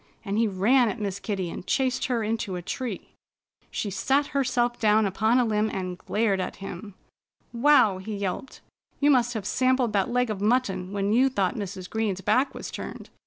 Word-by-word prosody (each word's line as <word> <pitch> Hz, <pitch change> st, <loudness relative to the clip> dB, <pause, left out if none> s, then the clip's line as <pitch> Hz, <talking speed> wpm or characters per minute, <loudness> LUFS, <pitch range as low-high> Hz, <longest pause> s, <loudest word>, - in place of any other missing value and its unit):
And 200 Hz, 0 st, -2 dB
he 230 Hz, -, +3 dB
ran 220 Hz, +6 st, +3 dB
at 230 Hz, -, -5 dB
Miss 200 Hz, -2 st, -3 dB
Kitty 190 Hz, -4 st, -3 dB
and -, -, -8 dB
chased 260 Hz, -2 st, +1 dB
her 240 Hz, -3 st, 0 dB
into 215 Hz, -3 st, -2 dB
a 180 Hz, -, -4 dB
tree. 230 Hz, +1 st, -5 dB, 0.6 s
She 205 Hz, -, -3 dB
sat 270 Hz, +8 st, +1 dB
herself 245 Hz, -3 st, +1 dB
down 215 Hz, 0 st, +4 dB
upon 215 Hz, +5 st, +2 dB
a 250 Hz, -, +3 dB
limb 215 Hz, -1 st, +1 dB
and 185 Hz, -2 st, -4 dB
glared 205 Hz, +1 st, 0 dB
at 185 Hz, -, -3 dB
him. 195 Hz, +1 st, -8 dB, 0.6 s
"Wow!" 235 Hz, -6 st, +4 dB
he 210 Hz, +3 st, -5 dB
yelped. 200 Hz, +6 st, -4 dB, 0.4 s
"You 290 Hz, 0 st, +4 dB
must 245 Hz, -2 st, +2 dB
have 210 Hz, -3 st, -3 dB
sampled 255 Hz, -1 st, +1 dB
that 195 Hz, 0 st, +1 dB
leg 250 Hz, -1 st, +1 dB
of 200 Hz, -2 st, -4 dB
mutton 205 Hz, -5 st, +1 dB
when 200 Hz, +1 st, 0 dB
you 260 Hz, +4 st, +4 dB
thought 195 Hz, -7 st, 0 dB
Mrs. 190 Hz, -3 st, -6 dB
Green's 210 Hz, -4 st, -2 dB
back 260 Hz, +8 st, +1 dB
was -, -, -6 dB
turned. -, -, -8 dB
215 Hz, 190 wpm, -26 LUFS, 195-245 Hz, 0.6 s, down